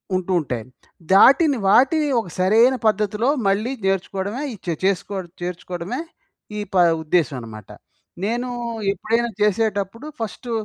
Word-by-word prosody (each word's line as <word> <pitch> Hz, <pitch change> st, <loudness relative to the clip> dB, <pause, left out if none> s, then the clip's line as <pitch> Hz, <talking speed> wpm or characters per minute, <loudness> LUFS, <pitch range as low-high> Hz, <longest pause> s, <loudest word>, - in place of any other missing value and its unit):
ఉంటూ 185 Hz, 0 st, -2 dB
ఉంటాయి. 125 Hz, -6 st, -4 dB, 0.5 s
దాటిని 275 Hz, -, +6 dB
వాటిని 275 Hz, +9 st, +4 dB
ఒక 220 Hz, -, -6 dB
సరైన 225 Hz, +8 st, +4 dB
పద్ధతిలో 215 Hz, +2 st, +1 dB, 0.2 s
మళ్ళీ 210 Hz, +5 st, +1 dB
నేర్చుకోవడమే 195 Hz, +4 st, -2 dB
ఈ -, -, -8 dB
చె 170 Hz, -, -1 dB
చేసుకో 195 Hz, +1 st, 0 dB, 0.3 s
చేర్చుకోవడమే 180 Hz, -, -5 dB, 0.6 s
ఈ -, -, -2 dB
ప -, -, -4 dB, 0.3 s
ఉద్దేశ్యమన్నమాట. 125 Hz, -, -2 dB, 0.5 s
నేను 240 Hz, +4 st, -1 dB, 0.4 s
ఎప్పుడైనా 230 Hz, +5 st, -1 dB
చేసేటప్పుడు 210 Hz, +2 st, 0 dB
ఫస్టు 230 Hz, +2 st, -5 dB
200 Hz, 115 wpm, -21 LUFS, 180-235 Hz, 0.6 s, దాటిని